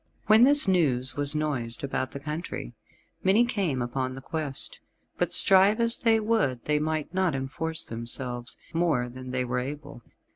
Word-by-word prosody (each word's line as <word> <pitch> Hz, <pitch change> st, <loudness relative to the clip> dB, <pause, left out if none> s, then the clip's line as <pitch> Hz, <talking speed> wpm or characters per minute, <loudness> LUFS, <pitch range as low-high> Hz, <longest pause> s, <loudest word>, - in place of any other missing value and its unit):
When 220 Hz, +3 st, +6 dB
this 285 Hz, -3 st, +7 dB
news 130 Hz, -9 st, +1 dB
was 145 Hz, +1 st, +1 dB
noised 140 Hz, -7 st, -2 dB
about 130 Hz, -1 st, -2 dB
the 140 Hz, -, -8 dB
country, 150 Hz, -, -6 dB, 0.5 s
many 205 Hz, +6 st, +4 dB
came 180 Hz, -, -1 dB
upon 130 Hz, +1 st, -3 dB
the 135 Hz, -, -9 dB
quest. 150 Hz, -2 st, -4 dB, 0.4 s
But 175 Hz, -1 st, 0 dB
strive 195 Hz, +4 st, +5 dB
as 230 Hz, 0 st, 0 dB
they 225 Hz, -1 st, +3 dB
would 210 Hz, -, 0 dB
they 150 Hz, 0 st, +1 dB
might 155 Hz, +1 st, -3 dB
not 185 Hz, -5 st, 0 dB
enforce 160 Hz, +5 st, -3 dB
themselves 120 Hz, +1 st, -5 dB, 0.2 s
more 160 Hz, -8 st, 0 dB
than 130 Hz, +1 st, -9 dB
they 125 Hz, 0 st, -1 dB
were 125 Hz, +1 st, -2 dB
able. 135 Hz, -1 st, -7 dB
150 Hz, 160 wpm, -26 LUFS, 130-185 Hz, 0.5 s, this